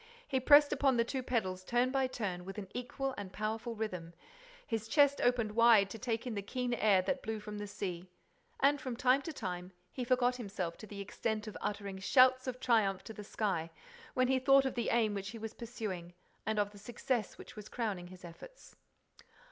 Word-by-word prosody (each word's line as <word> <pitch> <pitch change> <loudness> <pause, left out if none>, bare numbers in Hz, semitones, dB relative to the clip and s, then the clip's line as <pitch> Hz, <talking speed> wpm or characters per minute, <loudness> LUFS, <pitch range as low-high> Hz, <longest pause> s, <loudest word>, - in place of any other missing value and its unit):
He 265 - +1
pressed 290 +3 +7
upon 270 -3 +2
the 230 - +4
two 260 +3 -3
pedals 190 -7 -1
turn 245 +5 +1
by 265 -1 +2
turn, 200 -8 -4
with 195 +2 -8
an 200 -2 -5
equal 260 +2 -3
and 195 -2 -6
powerful 220 +3 -3
rhythm; 180 -6 -5 0.5
his 225 -2 -3
chest 285 +3 +4
opened 240 -3 +2
wide 220 -3 +5
to 225 - -7
take 230 0 -2
in 245 - -3
the 200 - -2
keen 245 +4 -2
air 205 -5 +4
that 270 +6 -1
blew 220 0 -3
from 210 0 -7
the 205 - -5
sea. 185 -3 -5 0.5
And, 280 +1 +3
from 255 -2 -4
time 255 +2 +4
to 325 - -5
time, 180 - -5 0.2
he 255 - -4
forgot 250 0 +2
himself 195 -7 -4
to 215 - -10
the 200 0 -7
extent 215 +2 -3
of 215 - -7
uttering 200 -2 -4
shouts 255 +5 +5
of 255 0 -3
triumph 210 -7 +2
to 220 - -8
the 210 - -8
sky, 190 -6 -2 0.5
when 255 0 +3
he 260 0 +3
thought 275 +1 +5
of 265 - -1
the 240 - -1
aim 225 -3 +2
which 200 0 -4
he 230 - -7
was 225 0 -6
pursuing 200 -7 -6 0.3
and 220 0 0
of 205 0 +1
the 205 - -13
success 235 +1 -2
that - - -12
was 210 -1 -9
crowning 205 -7 -3
his 185 0 -12
efforts. - - -13
220 Hz, 210 wpm, -33 LUFS, 200-255 Hz, 0.5 s, pressed